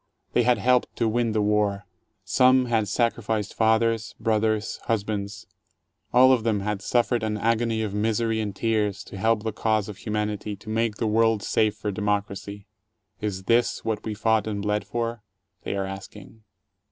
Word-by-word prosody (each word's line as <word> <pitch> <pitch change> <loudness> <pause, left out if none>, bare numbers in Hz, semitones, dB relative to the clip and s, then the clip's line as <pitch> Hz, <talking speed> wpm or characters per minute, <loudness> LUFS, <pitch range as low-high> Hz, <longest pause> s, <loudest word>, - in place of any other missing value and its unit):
They - - +4
had 120 +1 +3
helped 125 -1 +2
to 115 - +1
win 115 +1 +1
the 105 -1 +1
war. 105 -1 +1 0.4
Some 130 +5 +4
had 115 -3 +1
sacrificed 110 -1 -1
fathers, 115 0 +1
brothers, 110 -1 0
husbands 105 -2 -2 0.3
— - - -51
all 130 +1 +7
of 120 -4 +1
them 110 -3 +1
had 105 0 -2
suffered 120 +2 +1
an 110 -1 -1
agony 115 0 +1
of 105 -2 -3
misery 110 +1 0
and 105 -3 -3
tears, 105 -2 0
to 100 - -10
help 110 +1 +2
the 110 -1 -2
cause 110 -1 0
of 100 - -8
humanity, 105 0 -3
to 105 +2 -12
make 110 0 0
the 115 - -2
world 110 -1 +2
safe 110 -1 +1
for 105 -1 -3
democracy. 100 -1 -3 0.5
Is 100 -3 -3
this 115 +4 +1
what 110 -2 -2
we 110 -1 -4
fought 110 0 +1
and 100 -2 -3
bled 105 0 -1
for? 115 -1 -3 0.4
they - - -2
are 100 -1 -1
asking. 95 +3 -10
110 Hz, 175 wpm, -25 LUFS, 105-115 Hz, 0.5 s, all